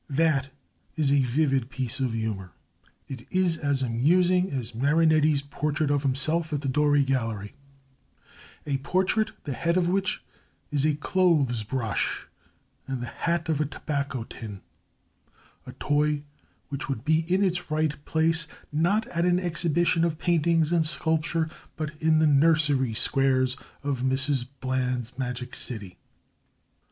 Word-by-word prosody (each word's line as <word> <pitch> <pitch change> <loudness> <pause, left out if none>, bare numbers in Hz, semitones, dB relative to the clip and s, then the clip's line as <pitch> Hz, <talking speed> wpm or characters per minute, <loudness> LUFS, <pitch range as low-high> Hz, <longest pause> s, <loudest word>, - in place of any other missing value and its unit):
That 140 -2 +1 0.5
is 150 -4 +1
a 140 -1 +4
vivid 135 -1 +1
piece 130 -2 -3
of 130 -3 0
humour. 105 -5 -4 0.5
It 130 -3 -8
is 185 -2 +2
as 140 -3 0
amusing 175 +10 +2
as 125 -3 -3
Marinetti's 155 +2 +3
portrait 145 +1 -1
of 145 -1 +2
himself 155 +5 0
at 145 -2 -1
the 140 - -3
Doré 145 +1 +3
Gallery 115 -6 -2 1.1
a 140 -2 0
portrait 185 +9 0
the 145 - -4
head 170 +6 0
of 175 -2 +2
which 195 +1 0 0.5
is 145 -1 +1
a 150 - +1
clothes 150 -7 +2
brush 115 -1 -2 0.6
and 135 -2 -3
the 125 - -4
hat 170 +6 -2
a 160 - +2
tobacco 140 -3 -3
tin 105 -3 -9 1.1
a - - -8
toy 150 0 0 0.5
which 140 0 -5
would 130 -2 -3
be 160 +1 +3
in 190 +2 +3
its 180 -3 -1
right 155 -1 -1
place, 160 0 +1 0.2
not 175 +9 +1
at 170 +1 0
an 180 0 +3
exhibition 170 -1 +1
of 165 -2 0
paintings, 165 -1 +2
and 165 -2 +2
sculpture, 160 +2 0 0.3
but 155 -1 -3
in 160 0 +4
the 155 - +4
nursery 145 -4 +3
squares 130 0 +3 0.3
of 140 -3 -2
Mrs 130 0 0
Bland's 125 -1 -2
Magic 125 -1 -4
City. 100 -8 -6
145 Hz, 140 wpm, -26 LUFS, 130-160 Hz, 1.1 s, a